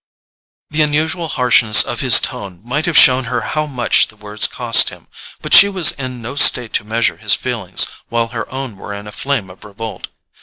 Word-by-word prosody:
The 155 +1 0
unusual 155 +3 -1
harshness 120 -6 +3
of - - -6
his - - +5
tone 90 -3 -7
might 145 +8 -3
have 170 - +1
shown 130 0 +5
her 120 +1 -4
how 155 0 -4
much 125 -5 0
the 110 - -17
words 105 0 -1
cost 120 -2 +3
him; - - -16 0.4
but - - -4
she 200 - +8
was 185 -5 +3
in 130 -3 -8
no 120 +5 -8
state 125 -4 +3
to - - -1
measure 115 +2 -2
his - - +2
feelings - - 0 0.2
while 115 -1 -2
her 115 -3 -8
own 130 -6 -7
were 100 +1 -9
in 100 +1 -10
a 105 - -10
flame 115 -4 -4
of 95 - -18
revolt. 110 +2 -9
120 Hz, 200 wpm, -15 LUFS, 110-140 Hz, 0.4 s, she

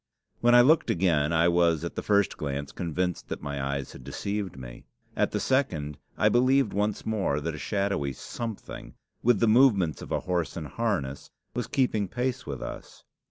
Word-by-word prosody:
When 120 0 +5
I 120 - +9
looked 155 +6 +4
again, 85 -4 +2
I 85 0 +4
was 85 -2 +3
at 85 - -4
the - - -3
first 100 -1 +2
glance 70 -1 -4
convinced 90 +1 -2
that - - -5
my 70 -1 -3
eyes 70 -1 -3
had 65 - -12
deceived 100 +6 -4
me. - - -10 0.3
At - - +2
the - - -2
second, 80 - 0 0.2
I - - +4
believed 130 -1 +3
once 105 +1 -1
more 100 -10 0
that 80 +2 -3
a 75 - -7
shadowy 100 -9 -1
something, 115 - -7 0.3
with 120 -3 +3
the 115 - +3
movements 110 - +4
of - - -9
a - - 0
horse 85 -5 -2
in 80 - -4
harness, 75 - -2 0.2
was 120 -3 -3
keeping 110 -6 +1
pace 125 +5 -3
with 70 -3 -5
us. - - -9
90 Hz, 185 wpm, -27 LUFS, 75-115 Hz, 0.3 s, I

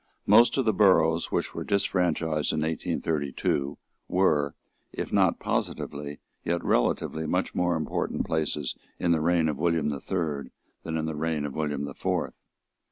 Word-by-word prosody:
Most 115 +6 +6
of 135 - +2
the 110 - +3
boroughs 90 -5 +4
which - - -1
were - - -4
disfranchised 85 -6 +1
in 75 - -1
1832 75 -3 -1 0.3
were, 75 -6 +2 0.4
if - - -5
not - - +4
positively, 75 0 -3 0.3
yet 85 0 -1
relatively, 80 +6 +1
much - - 0
more 90 -1 +1
important 80 - -2
places 75 -3 -1 0.2
in 85 - +1
the 80 -2 +3
reign 85 0 +3
of 75 -3 -2
William 85 -3 +1
the 70 -1 -3
Third 75 -8 -2 0.3
than 80 0 -3
in 80 - -1
the 80 - -2
reign 75 -1 -1
of 70 - -4
William 75 -2 -2
the 70 - -6
Fourth. - - -2
80 Hz, 160 wpm, -27 LUFS, 75-85 Hz, 0.4 s, Most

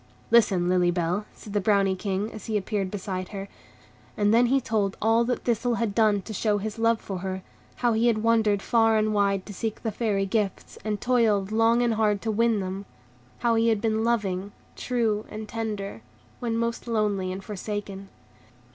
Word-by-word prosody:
"Listen, 195 -7 +4
Lily 180 -1 +3
Bell," 175 +4 -1
said 205 - -10
the 205 - +1
Brownie 195 -1 +3
King, 195 +2 -2
as 215 - -9
he 220 -2 +1
appeared 200 -1 -2
beside 185 -2 -4
her. 195 0 -6 0.7
And 205 0 +3
then 240 +1 +5
he 270 +3 +3
told 210 -5 -1
all 225 +2 +3
that 245 +1 -2
Thistle 240 0 +1
had 225 -3 -1
done 210 -3 +3
to 220 - -7
show 210 +1 +1
his 215 +2 -5
love 230 0 +3
for 195 -2 -5
her; 190 0 -4 0.3
how 240 -1 +1
he 225 +2 +2
had 220 -2 +1
wandered 220 -3 +3
far 225 -1 +3
and 215 0 +1
wide 200 -2 +1
to 205 - -8
seek 220 +3 -4
the 225 - -1
Fairy 205 -2 0
gifts, 200 -1 -2
and 210 -1 -2
toiled 215 -5 +2
long 225 +2 +3
and 235 -1 +2
hard 215 -2 +2
to 225 - 0
win 225 -1 +2
them; 190 +1 -5 0.6
how 235 -1 +3
he 225 0 +3
had 220 -2 +3
been 220 0 0
loving, 205 -4 -1 0.2
true, 225 -4 -1
and 215 0 -7
tender, 210 - -4 0.4
when 230 -2 -1
most 230 +1 -2
lonely 205 -5 0
and 190 +1 -6
forsaken. 200 -1 -5
215 Hz, 190 wpm, -26 LUFS, 195-225 Hz, 0.7 s, then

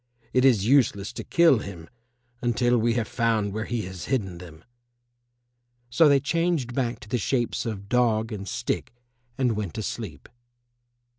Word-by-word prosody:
It 125 - +3
is 115 -7 +4
useless 115 -6 +2
to - - -6
kill 170 -8 +4
him 90 -6 -8 0.5
until 120 0 +2
we 115 +1 +1
have 115 -2 0
found 110 -4 0
where 110 +1 -3
he 120 -2 -2
has 95 -1 -7
hidden 95 -10 -2
them." 85 -2 -12 1.3
So 150 +5 +5
they 140 -1 +5
changed 160 -3 0
back 120 -2 -1
to - - -11
the 120 +3 -1
shapes 120 +2 -1
of 100 -3 -5
dog 115 -1 +1
and 100 -2 -6
stick 115 - -3 0.4
and 125 -4 +1
went 100 -6 -4
to - - -3
sleep. - - -6
115 Hz, 160 wpm, -25 LUFS, 100-125 Hz, 1.3 s, So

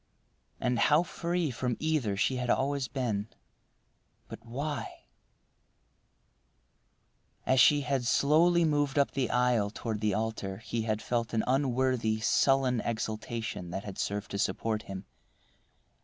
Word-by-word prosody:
And 125 -1 0
how 150 +7 +4
free 170 -2 -2
from 125 0 -2
either 150 -11 0
she 130 +5 +1
had 125 -1 -3
always 140 +1 +1
been—But 115 -6 -8
why— 140 +6 -5 2.4
As 130 - +3
she 145 +3 +6
had 135 -2 -1
slowly 165 +6 +4
moved 145 -2 +1
up 140 - +3
the 135 -3 -1
aisle 125 -4 +2
toward 110 0 -4
the 105 -2 +1
altar 110 -3 -3
he 115 +1 -3
had 110 -1 -2
felt 120 -1 -1
an 110 - +2
unworthy, 130 -4 +1
sullen 130 +1 +2
exultation 110 -4 -4
that 95 +3 -4
had 100 -3 -8
served 100 0 -3
to 100 - -3
support 110 +1 -1
him. 95 0 -6
125 Hz, 125 wpm, -30 LUFS, 110-140 Hz, 2.4 s, she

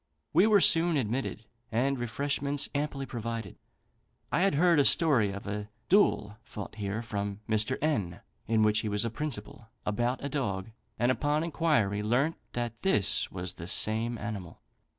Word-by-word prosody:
We 200 - +6
were 210 -3 +5
soon 165 -1 +5
admitted, 120 -2 -2 0.3
and 130 +4 +1
refreshments 140 +3 -1
amply 145 -1 -2
provided. 115 -5 -5 0.7
I - - +2
had 195 -4 +3
heard 170 0 +4
a - - +6
story 135 -9 +4
of 100 +1 -7
a 105 0 -4 0.2
duel 110 - +3
fought 105 -2 -8
here 105 +1 -3
from 100 -3 -4
Mr. 110 +4 0
N, 105 - -1 0.3
in 110 0 +3
which 105 0 +3
he 105 - -2
was 105 +2 +2
a 115 - -2
principal, 115 -5 -5 0.2
about 120 +6 -1
a - - 0
dog; 115 -8 -3 0.3
and 120 +2 +3
upon 145 +5 0
inquiry 145 -12 +1
learnt 125 +9 +1 0.2
that 120 -1 -4
this 150 - +2
was 90 -1 -3
the 85 - -9
same 115 +4 +1
animal. 105 -5 -6
115 Hz, 160 wpm, -29 LUFS, 105-145 Hz, 0.7 s, We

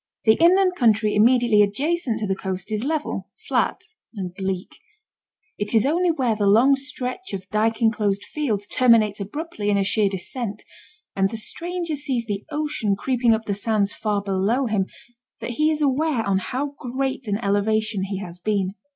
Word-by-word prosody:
The 220 - +7
inland 365 +2 +5
country 220 - +3
immediately 235 0 +4
adjacent 265 - 0
to 210 - -1
the 190 - 0
coast 190 +1 -5
is 215 +1 -1
level, 305 +2 -2 0.2
flat, - - 0 0.3
and 185 -3 -5
bleak; 190 -1 -4 0.8
it 205 +2 -1
is 225 - +4
only 345 +5 +2
where 255 -8 +1
the 205 -1 0
long 240 +7 +6
stretch 270 - -5
of 190 -1 -5
dyke 220 +2 +1
enclosed 210 -3 +1
fields 225 -10 -2
terminates 220 -3 +3
abruptly 215 - -4
in 205 - +3
a 200 - +2
sheer 200 +1 +2
descent, 200 +3 -5 0.5
and 195 0 +2
the 225 - -4
stranger 340 +7 -3
sees 270 -5 -2
the 205 -2 -3
ocean 295 -9 -1
creeping 240 +1 +2
up 220 0 -6
the 205 - -1
sands 205 0 0
far 210 -2 -1
below 200 +7 +1
him, 210 -4 0 0.5
that - - -4
he 305 +6 +2
is 305 -1 0
aware 280 -3 +1
on 195 -1 +2
how 275 +8 -3
great 260 0 -3
an 200 -1 0
elevation 210 -1 0
he 195 0 -4
has 180 -3 -8
been. 195 -1 -1
220 Hz, 175 wpm, -23 LUFS, 200-270 Hz, 0.8 s, The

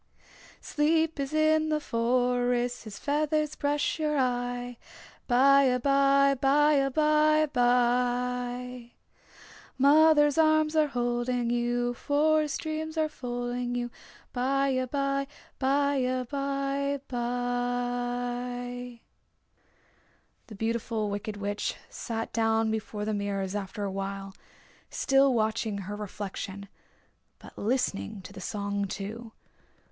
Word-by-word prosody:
Sleep 320 +1 +1
is 275 0 -2
in 310 0 +3
the 305 -1 +1
forest 245 -1 0
His 210 -2 -8
feathers 300 +1 0
brush 290 +2 -1
your 300 -1 0
eye. 245 -1 -1 0.5
By 275 +3 +5
abye, 275 +1 +3
by 295 +2 +4
abye 305 +1 +3
bye. 245 0 0 0.8
Mother's 295 +2 +5
arms 310 0 +3
are 310 -1 +4
holding 240 -1 -1
you, 240 0 0
Forest 300 +3 +1
dreams 315 0 -4
are 310 -1 +1
folding 245 -2 -4
you. 240 0 -3 0.4
By 275 +2 +1
abye, 275 +2 -1 0.3
by 280 +1 +2
abye 275 +2 -1
bye. 245 0 -3 1.5
The 220 - -10
Beautiful 225 0 -2
Wicked 205 +1 -4
Witch 205 0 -2 0.2
sat 225 -2 -5
down 225 -1 +2
before 215 -1 -4
the 215 - -1
mirrors 200 -2 -2
after 205 +1 -4
a 200 - -2
while, 195 0 -5 0.6
still 270 0 +3
watching 220 -1 0
her 200 +1 -5
reflection, 200 -1 -6 0.7
but - - -14
listening 200 - -2
to - - -11
the 190 - -9
song, 200 +1 -2
too. 220 +4 -6
245 Hz, 105 wpm, -28 LUFS, 230-280 Hz, 1.5 s, By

